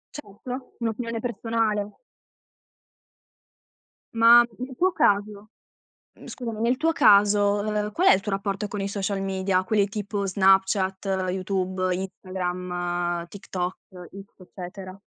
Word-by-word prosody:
Certo, 250 +1 -8
un'opinione 230 0 -3
personale. 220 -2 -2 2.2
Ma 235 +1 +8 0.2
nel 255 +1 -6
tuo 370 +1 +3
caso 205 - 0 0.7
mhmm, - - -14
scusami, 230 -4 -6
nel 240 +2 +2
tuo 325 +3 +1
caso, 205 -5 +4
ehm, 210 0 -2
qual 360 - +1
è - - +9
il 190 - +1
tuo 205 - -4
rapporto 195 +1 -2
con 205 - -5
i 195 - -2
social 200 0 -2
media? 190 -1 0
Quelli 205 0 +2
tipo 205 -1 -3
Snapchat, 190 0 +2 0.2
YouTube, 185 0 -1
Instagram, 180 -2 -3
TikTok, 180 -1 -5 0.2
X 190 +2 -12
eccetera? 185 +1 -10
200 Hz, 120 wpm, -25 LUFS, 185-215 Hz, 2.2 s, è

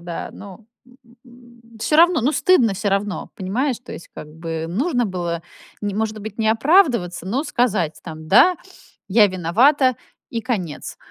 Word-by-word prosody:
да, 170 -1 -6
но, 200 +2 -12 0.6
м, 240 -1 -19 0.2
всё 300 - +1
равно, 340 -1 +5
ну, 265 +6 +1
стыдно 270 - +3
всё 205 +2 -2
равно, 200 0 -2
понимаешь? 235 +7 -1
То 245 - -11
есть, - - -10
как - - -8
бы, 165 +1 -5
нужно 245 - 0
было, 170 -3 -4 0.4
не 205 -1 -3
может 215 0 -2
быть, 215 0 -8
не 220 -1 +1
оправдываться, 235 - +2
но 255 +10 -1
сказать, 205 - 0
там: 160 -2 -9
"Да, 350 - +6 0.5
я 210 +2 +5
виновата"- 240 - +2 0.3
и 230 - -3
конец. 205 - -4
215 Hz, 155 wpm, -21 LUFS, 180-250 Hz, 0.6 s, Да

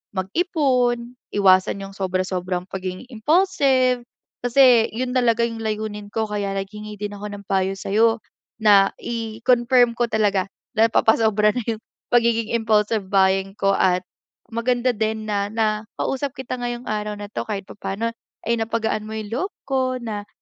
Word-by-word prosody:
mag-ipon, 250 - 0 0.2
iwasan 190 0 +4
'yong 195 - -9
sobra-sobrang 185 -1 -2
pagiging 185 +1 -5
impulsive, 260 - +2 0.4
kasi 245 -2 +6
'yon 250 +1 -2
talaga 235 -2 +3
yung 230 -1 -5
layunin 215 -1 -3
ko 220 +1 -1
kaya 205 -2 -2
naghingi 210 +2 -6
din 205 0 -5
ako 210 0 -6
ng 200 - -10
payo 190 0 0
sa'yo 225 +4 +2 0.4
na 200 -2 +6
i-confirm 235 +2 +2
ko 240 0 0
talaga 205 -4 +1 0.3
napapasobra 220 -1 +4
na 245 - -1
'yong 225 -1 -2 0.3
pagiging 230 -2 +2
impulsive 220 -3 +1
buying 195 0 +2
ko 195 -1 +2
at 185 -2 +2 0.5
maganda 245 +2 +1
din 220 -1 -2
na 200 -1 0
nakausap 225 +5 -2
kita 255 -1 -5
ngayong 240 0 -4
araw 210 0 -2
na 205 0 -8
'to - - -4
kahit 205 -2 -3
papaano, 210 +3 -4 0.3
eh, 235 +1 +1
napagaan 220 -1 -1
mo 220 - -6
yung 215 -1 -6
loob 365 - -2
ko 260 -1 0
na, 210 -3 -5
220 Hz, 145 wpm, -22 LUFS, 200-240 Hz, 0.5 s, kasi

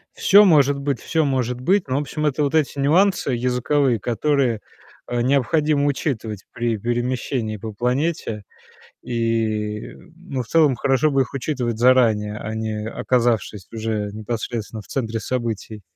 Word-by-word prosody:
Всё 205 +1 +6
может 145 -5 +4
быть, 140 -4 -2
всё 160 -2 0
может 125 -3 -1
быть. 185 +4 +2
Но, 130 - 0
в 145 - +1
общем, 150 +1 -3
это 150 0 +1
вот 140 +2 0
эти 145 -2 +1
нюансы 170 +1 +3
языковые, 125 +1 +1
которые, 120 0 0 0.5
э, 120 -1 -1
необходимо 145 +3 +2
учитывать 115 - -2
при 120 -1 -1
перемещении 120 0 -2
по 110 +2 -6
планете. 125 -2 -1 0.6
И, 110 -3 -1
м, - - -15
ну, 140 -7 -5
в - - -12
целом, 150 -3 +3
хорошо 140 +3 +2
бы 135 -1 +3
их 125 - -7
учитывать 125 -4 -2
заранее, 115 -4 +3
а 110 +1 -5
не 110 -1 -3
оказавшись 115 -5 0
уже 110 -2 -2
непосредственно 110 0 -5
в - - -20
центре 115 -4 -3
событий. 110 -3 -4
125 Hz, 150 wpm, -22 LUFS, 110-140 Hz, 0.6 s, Всё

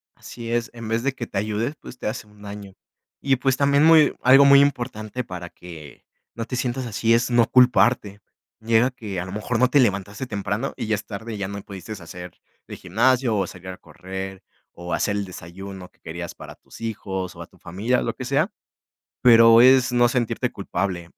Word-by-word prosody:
Así 115 -1 -9
es, 120 0 -1
en 115 -2 -8
vez 115 +1 -1
de 140 0 0
que 120 -3 -6
te 95 - -6
ayude, 110 +6 -1
pues 125 - -11
te - - -5
hace 110 0 -5
un 105 0 -20
daño, 100 -1 -9 0.5
y 135 -1 +2
pues 135 0 0
también, 140 +1 +3
muy 160 -2 +6
algo 135 +3 +7
muy 140 0 +8
importante 125 -4 -2
para 90 -5 -8
que 80 -7 -13 0.3
no 115 - -4
te 125 - -5
sientas 125 +1 -2
así 115 0 +1
es 115 +1 +2
no 120 -1 +4
culparte. 120 -5 +3 0.4
Llega 115 +3 +2
que 105 -7 -6
a 90 - -4
lo 95 - -8
mejor 110 +3 -2
no 125 0 +4
te 145 - +4
levantaste 100 +1 -1
temprano 105 +3 -3
y - - -4
ya 110 - +1
es 105 - -7
tarde 110 +1 -7
ya 100 - -3
no 100 0 -6
pudiste 95 +1 -10
hacer 90 -2 -10 0.3
de - - -8
gimnasio 130 -3 +1
o 95 - +1
salir 90 +1 -10
a 90 - -7
correr 95 +1 -8 0.3
o 85 0 -7
hacer 100 - 0
el 100 - -2
desayuno 95 +1 -10
que - - -36
querías 85 +1 -7
para - - -11
tus - - -16
hijos 95 -5 -4
o - - -10
a - - -9
tu - - -24
familia 110 +9 -1
o - - -2
lo - - -3
que - - -7
sea, 145 - +1 0.7
pero 115 -1 +7
es 130 0 +5
no 120 0 +4
sentirte 120 -2 -1
culpable. 90 -3 -4
110 Hz, 210 wpm, -23 LUFS, 95-125 Hz, 0.7 s, muy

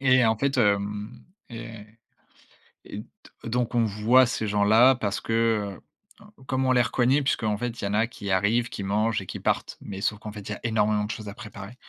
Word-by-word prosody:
Et 130 -2 +4
en 110 0 +3
fait, 135 +2 0
hem, 105 -1 0 0.2
et 115 -2 -9 1.0
et - - -7
d - - -9 0.4
donc 120 +1 -1
on 115 -1 +3
voit 110 +5 +4
ces 110 -3 -2
gens-là 110 +6 +5
parce 105 -5 -2
que, 115 -3 0 0.4
heu, 210 - -15 0.2
comme 130 +1 0
on 130 - +3
les 125 - +5
reconnaît 130 +6 +2
puisqu'en 110 -6 0
fait, 120 +1 -4
il - - -2
y - - 0
en 100 - -3
a 110 +2 +3
qui 100 -4 -8
arrivent, 115 +6 +2
qui 100 - -6
mangent 105 +2 0
et 95 - -9
qui - - -7
partent, - - -1
mais 100 -1 -7
sauf 105 +1 -1
qu'en 105 -1 -7
fait, 105 -1 -8
il - - -4
y 105 - -2
a - - -12
énormément 105 -2 +1
de 110 - -4
choses 110 -3 -7
à 100 - -7
préparer, 105 -1 -10
110 Hz, 220 wpm, -26 LUFS, 105-120 Hz, 1.0 s, gens-là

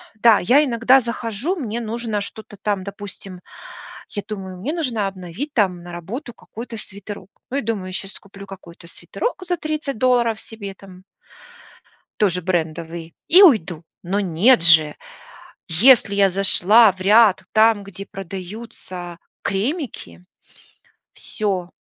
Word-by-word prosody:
да, 220 0 +5
я 260 +11 +4
иногда 250 +1 +4
захожу, 235 - -3
мне 235 - -4
нужно 225 -1 -3
что-то 210 +1 -8
там, 200 -3 -1
допустим, 200 -2 -9 0.7
я 205 - -4
думаю, 190 -3 -7
мне 255 +12 -3
нужно 250 - -1
обновить 195 - -6
там 185 -6 +1
на 175 - -9
работу 225 - -7
какой-то 230 +1 -9
свитерок. 200 -2 -8 0.2
Ну, 270 - -2
я - - -2
думаю, 200 -4 -3
сейчас 195 +1 -4
куплю 200 0 -13
какой-то 175 -3 -12
свитерок 390 - -5
за 355 0 0
30 305 -6 -4
долларов 240 -3 +2
себе 205 -3 -9
там 190 -1 -15 1.2
тоже 180 -4 +2
брендовый, 165 -1 -3
и 360 +4 +7
уйду. 185 - +4 0.2
Но 190 +3 -1
нет 200 +7 +4
же! 160 -3 +5 0.7
Если 200 +4 +5
я 200 -1 +4
зашла 195 +3 +5
в 185 - -19
ряд 205 -1 +5
там, 220 -1 +4
где 200 0 -9
продаются 185 -2 -8 0.2
кремики- 200 - -4 0.9
всё. 190 -4 -3
200 Hz, 130 wpm, -21 LUFS, 185-235 Hz, 1.2 s, и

